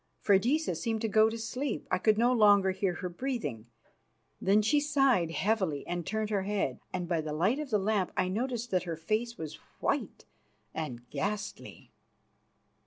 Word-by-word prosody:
Freydisa 240 +11 +2
seemed 225 -2 -2
to 225 - 0
go 220 +1 +4
to 225 - -5
sleep; 235 +3 -3
I 185 - +2
could 215 +2 +3
no 240 +2 +4
longer 205 -4 +5
hear 185 -1 -1
her 185 - -4
breathing. 175 - -4 0.7
Then 205 +3 +4
she 290 +8 +3
sighed 270 - +2
heavily 185 -5 0
and 175 -1 -4
turned 220 0 -2
her 200 -2 +1
head, 195 -10 -1
and 180 -1 -3
by 170 -2 0
the 155 -1 -4
light 195 - +1
of 300 -3 -4
the 215 - +3
lamp 200 -2 0
I 185 - +2
noted 235 +5 -1
that 185 -1 +2
her 165 - -2
face 220 +8 -2
was 155 -2 -7 0.2
white - - -2 0.5
and 125 -6 -5
ghastly. 205 +1 -4
205 Hz, 175 wpm, -30 LUFS, 180-230 Hz, 0.7 s, longer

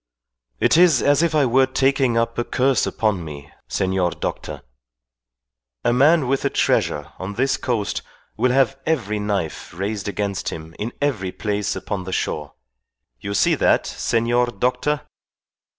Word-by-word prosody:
"It - - +4
is 170 -7 +5
as 145 +2 +4
if 170 -2 +1
I 145 -2 +4
were 130 +2 +4
taking 135 -2 +2
up 115 0 0
a - - +1
curse 130 +2 +1
upon 105 -6 0
me, 75 -2 -9 0.2
senor 95 -1 0
doctor. - - -5 1.2
A - - +2
man 145 +3 +4
with 135 +1 0
a - - +2
treasure 75 0 0
on 95 +2 -5
this 135 +2 +1
coast 120 -7 -2 0.3
will 125 +3 +2
have 135 +1 +2
every 115 -10 0
knife 100 -6 -3
raised 100 +2 -3
against 100 -1 -2
him 80 0 -8
in 110 +3 -3
every 105 -10 -1
place 105 0 -2
upon 95 -3 -4
the 95 - -5
shore. 75 -1 -3 0.6
You 100 +10 -4
see - - +3
that, - - +3
senor 120 +1 +1
doctor? 125 +6 -1
115 Hz, 150 wpm, -22 LUFS, 100-135 Hz, 1.2 s, is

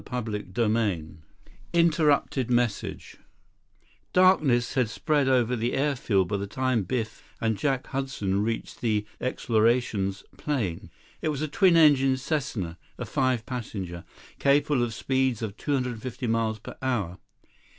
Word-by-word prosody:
39 110 -4 -4
CHAPTER 115 -2 +2
VI 105 -8 0 0.7
Interrupted 155 -6 +2
Message 120 -4 -1 1.0
Darkness 155 -10 +4
had 125 -5 +1
spread 145 +3 +1
over 125 -2 +3
the 120 +1 -1
airfield 120 -9 +1
by 100 - -1
the 100 0 -4
time 130 +2 0
Biff 110 +1 -3 0.2
and 110 -1 +1
Jack 135 +5 -1
Hudson 130 -8 -2
reached 115 +1 -3
the 105 -3 +1
"Explorations" 115 -5 +1
plane. 115 - -2 0.3
It 155 - 0
was 150 0 -2
a - - 0
twin 170 +3 +4
engine 135 -4 +5
Cessna, 125 - -3 0.2
a - - -4
five 130 -4 0
passenger, 100 -9 -5 0.4
capable 140 -1 +3
of 120 - +1
a - - -8
speed 130 0 0
of 105 -2 -4
250 125 -3 -3
miles 115 -1 0
per 110 - -10
hour. 105 -9 -1
120 Hz, 135 wpm, -27 LUFS, 110-135 Hz, 1.0 s, engine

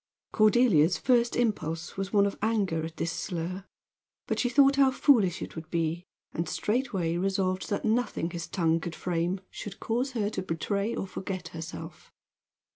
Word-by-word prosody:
Cordelia's 215 -7 +4
first 240 -2 +2
impulse 175 -8 -1
was 195 0 -3
one 200 -2 +4
of 200 - -1
anger 200 -7 +1
at 160 +1 -6
this 165 - -1
slur; 180 +2 -4 0.6
but - - -2
she 245 - +2
thought 275 +2 +5
how 275 -1 +6
foolish 235 - +3
it - - -8
would 160 -1 -8
be, 170 +1 -1 0.3
and 165 0 -2
straightway 210 -8 -1
resolved 190 0 0
that 205 - -1
nothing 220 -6 0
his 170 -1 -5
tongue 165 -3 +1
could 170 0 -5
frame 175 +2 -1
should 205 0 -8
cause 250 +4 -1
her 210 -3 -1
to - - -3
betray 200 +6 -2
or - - -2
forget 185 -2 -5
herself. 165 0 -8
190 Hz, 165 wpm, -28 LUFS, 170-225 Hz, 0.6 s, how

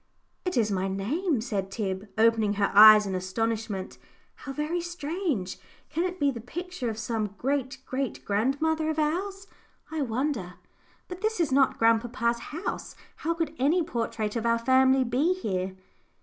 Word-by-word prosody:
"It 365 -7 -1
is 215 -3 +2
my 190 0 0
name," 250 - -1
said 200 -5 -3
Tib, 195 -1 -3
opening 220 -2 +3
her 200 -1 +1
eyes 215 0 +9
in 195 - -3
astonishment; 205 +1 -3 0.3
"how 275 - -8
very 300 +5 -2
strange! 335 - -3 0.3
Can 335 +3 0
it 370 0 -4
be 285 -1 +3
the 235 -3 -7
picture 345 0 -5
of 220 - -4
some 215 -2 -3
great 270 0 -1
great 260 -2 -3
grandmother 285 +9 +1
of 315 - -2
ours, 380 +6 -1 0.5
I 320 -1 -2
wonder? 235 - -2 0.5
But 360 0 -8
this 435 -2 0
is 320 -5 +1
not 270 0 +3
grandpapa's 235 +1 +2
house. 330 +6 -5 0.2
How 335 +1 -1
could 330 -1 -2
any 315 +7 +3
portrait 230 -7 -3
of 230 - -1
our 230 0 +3
family 260 +2 +4
be 270 +9 +1
here?" 190 - -3
250 Hz, 160 wpm, -27 LUFS, 215-315 Hz, 0.5 s, eyes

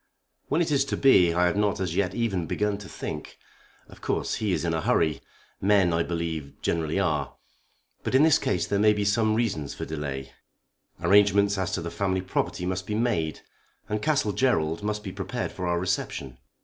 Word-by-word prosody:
"When 155 +4 +1
it 160 - -3
is 140 -2 +3
to - - -2
be 90 -11 +5
I 90 +1 +2
have 90 - +1
not 105 -2 +1
as 90 -3 -2
yet 95 -1 0
even 95 -8 -1
begun 105 -1 -1
to 100 - -10
think. - - -6 0.5
Of - - -16
course - - -1
he 105 -2 +1
is 90 - 0
in 85 - 0
a 80 - 0
hurry. 80 -1 +1 0.4
Men, 95 -3 +4
I 85 - +2
believe, 85 -4 -4
generally 80 +2 0
are. 75 -7 -1 0.7
But - - -2
in 135 - +6
this 160 -2 +5
case 90 - 0
there 100 - 0
may 105 0 +5
be 105 -1 -1
some 110 +1 +2
reasons 95 -12 -1
for - - -5
delay. 70 -3 -5 0.7
Arrangements 100 +2 +4
as 95 - -1
to 85 - -2
the 85 - -4
family 95 -2 -1
property 95 -1 -2
must 95 0 -3
be 105 - -2
made, 105 -10 0 0.5
and 105 0 -2
Castle 140 -7 +1
Gerald 85 -10 +1
must 105 0 -2
be 95 - -5
prepared 100 +6 -4
for 90 -1 -4
our 85 0 +1
reception. 70 -8 -3
95 Hz, 200 wpm, -26 LUFS, 85-105 Hz, 0.7 s, in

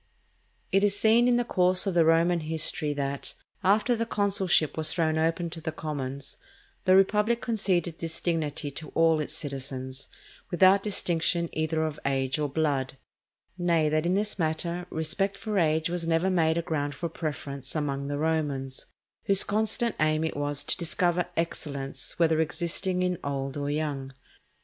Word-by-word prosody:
It 195 +1 +3
is 205 0 +3
seen 230 +2 +4
in 245 - +4
the 245 - +1
course 185 -3 +3
of 195 - 0
the 170 -1 +4
Roman 165 +2 +3
history 155 -1 0
that, 140 -1 -4 0.3
after 210 +5 +3
the 230 0 -2
consulship 195 -6 +1
was 155 -1 +3
thrown 160 -2 +1
open 165 +1 0
to 165 - -7
the 160 - -3
commons, 140 -3 -6 0.5
the 185 0 +6
republic 210 +4 +3
conceded 185 -8 -1
this 165 -1 -2
dignity 150 -4 -2
to 155 +3 -7
all 165 -1 +4
its 150 - -3
citizens, 135 -2 -5 0.4
without 185 +3 +5
distinction 170 -4 0
either 160 0 0
of 150 -1 -4
age 135 0 0
or 150 -1 -1
blood; 135 -3 -1 0.6
nay, 170 -3 +2
that 155 +2 +1
in 180 - +2
this 205 0 -1
matter 170 +2 -2
respect 185 +5 -1
for 210 -2 -1
age 160 -1 +2
was 170 -1 -2
never 165 +3 +2
made 165 -2 +2
a 170 - 0
ground 145 -4 -2
for 170 - -3
preference 145 -4 -5
among 140 -2 -2
the 145 0 -2
Romans, 145 -4 -2 0.4
whose 195 -1 +6
constant 220 +2 0
aim 155 0 +2
it 160 - -2
was 145 0 -1
to - - 0
discover 175 0 0
excellence 140 -4 -4
whether 160 -2 +3
existing 175 +3 -1
in 180 -2 -1
old 135 -1 -3
or 145 -1 -3
young. 145 -3 -3
160 Hz, 165 wpm, -27 LUFS, 145-180 Hz, 0.6 s, the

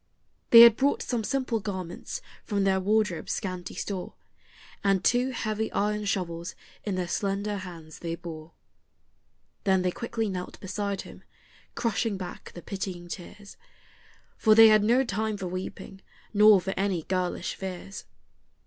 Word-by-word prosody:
They 230 - +11
had 235 -2 +9
brought 280 +1 +1
some 240 -3 -2
simple 255 -1 -1
garments 190 - -5 0.2
from 200 -2 -1
their 190 -1 +3
wardrobe's 210 -3 0
scanty 185 -3 -5
store, 190 -3 -5 0.7
And 195 -2 +2
two 250 +1 +3
heavy 220 -3 -2
iron 210 +1 0
shovels 175 -4 -3 0.3
in 200 -3 -2
their 180 -1 -2
slender 200 +3 -1
hands 170 -5 -9
they 165 -1 -3
bore. 165 -2 -9 1.1
Then 190 -2 +3
they 180 - +1
quickly 230 +1 -3
knelt 180 -2 -5
beside 200 0 -3
him, - - -13 0.5
crushing 225 -2 0
back 180 -2 -8
the 175 - -9
pitying 185 -3 -5
tears, 200 +3 -9 0.8
For 215 -1 +5
they 225 0 +9
had 215 -1 +5
no 240 +5 +4
time 215 -2 -2
for 195 - -5
weeping, 185 +1 -6 0.3
nor 210 -1 +7
for 190 +1 -3
any 190 -4 0
girlish 185 0 -2
fears. 190 +1 -7
195 Hz, 145 wpm, -27 LUFS, 180-215 Hz, 1.1 s, They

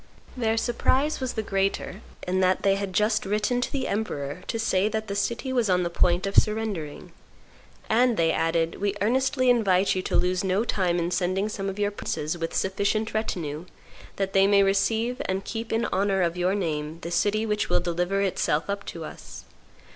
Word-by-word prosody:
Their 225 -3 0
surprise 260 +5 +1
was 260 -2 -3
the 220 - -2
greater 195 0 -1 0.3
in 185 +1 +1
that 185 0 +2
they 195 - +4
had 195 -1 -3
just 210 +2 +1
written 210 +5 0
to - - -2
the 270 -2 -2
emperor 150 -8 -3
to - - -2
say 210 -2 +1
that 220 0 -3
the 200 - -3
city 235 +5 -2
was 240 -5 +1
on 180 -1 +3
the 170 - -2
point 175 +2 +2
of 195 - -3
surrendering, 210 -9 0 0.8
and 240 +1 +3
they 165 -1 +3
added, 165 +2 0
"We 200 0 0
earnestly 260 +4 +1
invite 200 -6 +3
you 185 - -1
to - - -3
lose 180 +1 +1
no 190 +3 +1
time 185 -6 0
in 170 0 -1
sending 185 +3 0
some 195 -2 -3
of 195 - -6
your 205 0 0
princes 155 -5 -3
with 165 -1 -4
sufficient 200 +3 0
retinue, 170 -7 -3 0.5
that 195 -1 -2
they 195 0 +5
may 200 0 +5
receive 220 +5 +1
and 190 +1 -2
keep 225 0 -5
in 225 +1 +1
honor 195 0 +2
of 170 0 0
your 180 +2 +1
name 155 -4 -2
the 170 - -6
city 210 +5 +1
which 210 -1 -1
will - - +3
deliver 175 +3 -1
itself 185 -3 0
up 200 0 -4
to 165 -2 -6
us. - - -10
195 Hz, 195 wpm, -26 LUFS, 180-220 Hz, 0.8 s, they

